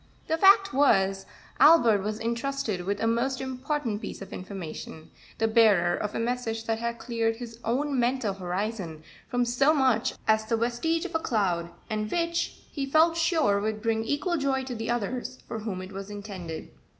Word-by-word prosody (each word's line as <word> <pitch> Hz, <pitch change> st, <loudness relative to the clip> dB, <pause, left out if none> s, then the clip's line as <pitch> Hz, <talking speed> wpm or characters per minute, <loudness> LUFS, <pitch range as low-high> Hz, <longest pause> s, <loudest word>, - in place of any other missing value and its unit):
The 320 Hz, -, +1 dB
fact 390 Hz, +1 st, +6 dB
was, 195 Hz, -8 st, +3 dB, 0.3 s
Albert 235 Hz, -11 st, +6 dB
was 210 Hz, +2 st, -3 dB
intrusted 235 Hz, -4 st, -2 dB
with 200 Hz, +1 st, -1 dB
a -, -, +1 dB
most 240 Hz, +3 st, +1 dB
important 260 Hz, -3 st, -3 dB
piece -, -, -6 dB
of 195 Hz, -1 st, -9 dB
information 180 Hz, -4 st, -7 dB, 0.3 s
the 225 Hz, -, +2 dB
bearer 210 Hz, -6 st, +4 dB
of 210 Hz, -, -4 dB
a -, -, -1 dB
message 230 Hz, -1 st, -2 dB
that 225 Hz, 0 st, -1 dB
had 235 Hz, 0 st, -2 dB
cleared 230 Hz, -1 st, -1 dB
his 230 Hz, -1 st, -9 dB
own 270 Hz, +3 st, 0 dB
mental 240 Hz, -3 st, +1 dB
horizon 185 Hz, -3 st, -4 dB, 0.3 s
from 245 Hz, 0 st, +1 dB
so 270 Hz, +6 st, +3 dB
much 260 Hz, -5 st, +2 dB
as 220 Hz, 0 st, +4 dB
the 230 Hz, +1 st, 0 dB
vestige 245 Hz, +9 st, 0 dB
of 365 Hz, -, -6 dB
a 325 Hz, -, +1 dB
cloud, 185 Hz, -, 0 dB, 0.2 s
and 215 Hz, -1 st, -2 dB
which 340 Hz, 0 st, -1 dB
he 275 Hz, -2 st, -3 dB
felt 320 Hz, +4 st, +4 dB
sure 320 Hz, -, +2 dB
would 215 Hz, 0 st, -2 dB
bring 225 Hz, -1 st, +1 dB
equal 295 Hz, +8 st, -1 dB
joy 270 Hz, -2 st, 0 dB
to 260 Hz, -1 st, -5 dB
the 225 Hz, -1 st, -4 dB
others 240 Hz, +2 st, -2 dB
for 225 Hz, -, -4 dB
whom 200 Hz, -4 st, -4 dB
it 185 Hz, -, -9 dB
was 195 Hz, +1 st, -7 dB
intended. 195 Hz, -6 st, -7 dB
230 Hz, 180 wpm, -27 LUFS, 205-265 Hz, 0.3 s, fact